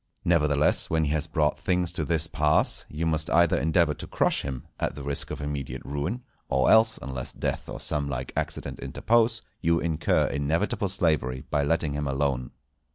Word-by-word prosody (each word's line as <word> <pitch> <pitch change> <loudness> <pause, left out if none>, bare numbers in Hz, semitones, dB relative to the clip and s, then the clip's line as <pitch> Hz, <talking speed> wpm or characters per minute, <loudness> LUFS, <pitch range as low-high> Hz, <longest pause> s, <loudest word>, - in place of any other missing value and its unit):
Nevertheless, 75 -4 +2
when 80 -1 +1
he 75 - 0
has 80 +1 0
brought 75 -4 0
things 90 -2 0
to 85 -2 -2
this 80 0 +1
pass, 75 -1 +1
you 80 +3 -3
must 80 0 +1
either 85 0 +4
endeavour 80 -1 +2
to - - -7
crush - - +1
him, 65 -3 -5
at - - -1
the 70 - -7
risk 70 0 -2
of - - -5
immediate 75 -2 -5
ruin, 75 - -3 0.3
or 65 -1 +3
else, 110 0 +5
unless 65 -2 -5
death - - -3
or - - -6
some 75 -2 0
like 65 -2 -4
accident - - -3
interpose, 115 0 +1 0.2
you 85 0 +2
incur 80 -2 +1
inevitable 80 +9 0
slavery 75 -9 0
by 75 - +2
letting 75 0 0
him 75 0 -2
alone. 70 -2 -1
75 Hz, 180 wpm, -26 LUFS, 70-85 Hz, 0.3 s, else